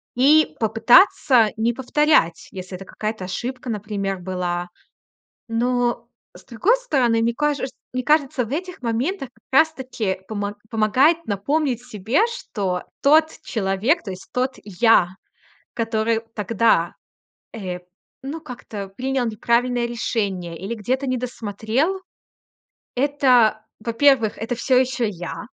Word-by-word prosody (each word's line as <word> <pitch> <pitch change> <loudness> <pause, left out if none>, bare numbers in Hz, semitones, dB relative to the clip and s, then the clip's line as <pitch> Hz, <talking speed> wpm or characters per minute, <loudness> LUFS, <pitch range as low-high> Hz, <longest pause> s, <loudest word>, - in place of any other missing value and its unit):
и 295 +5 +4
попытаться 230 - +5
не 225 +2 +2
повторять, 265 - +2
если 185 0 -7
это 195 +1 -9
какая-то 215 0 -4
ошибка, 250 +7 -5
например, 205 -3 -3
была. 175 -1 -3 0.8
Но, 240 0 0 0.3
с - - -15
другой 265 - +2
стороны, 255 - +1
мне 230 +1 +1
каже 295 +1 0
чт 265 - -11 0.2
мне 255 0 -2
кажется, 275 -2 +2
в 225 - -10
этих 360 +5 -4
моментах 260 - -1
как 265 - 0
раз 320 0 +2
таки 230 -9 -3
помо 205 -1 -3 0.2
помогает 260 +10 +3
напомнить 245 +5 -1
себе, 220 - 0
что 200 - -3 0.2
тот 310 +3 +5
человек, 220 - 0
то 200 - -7
есть 185 0 -9
тот 255 +1 0
я, 205 -2 +3 0.6
который 225 0 0 0.2
тогда, 210 -5 +2 0.6
э, 185 -6 -5 0.4
ну, 295 +4 -5
как-то 225 -8 -8
принял 255 +5 -2
неправильное 235 +2 +1
решение 200 -7 -2
или 195 +5 -4
где-то 255 +6 -2
недосмотрел,- 250 - -1 0.9
это, 250 -5 +3 0.2
во-первых, 230 0 +2
это 225 +3 -3
всё 250 +2 +2
ещё 255 -2 0
я. 175 -4 -6
235 Hz, 125 wpm, -22 LUFS, 210-265 Hz, 0.9 s, попытаться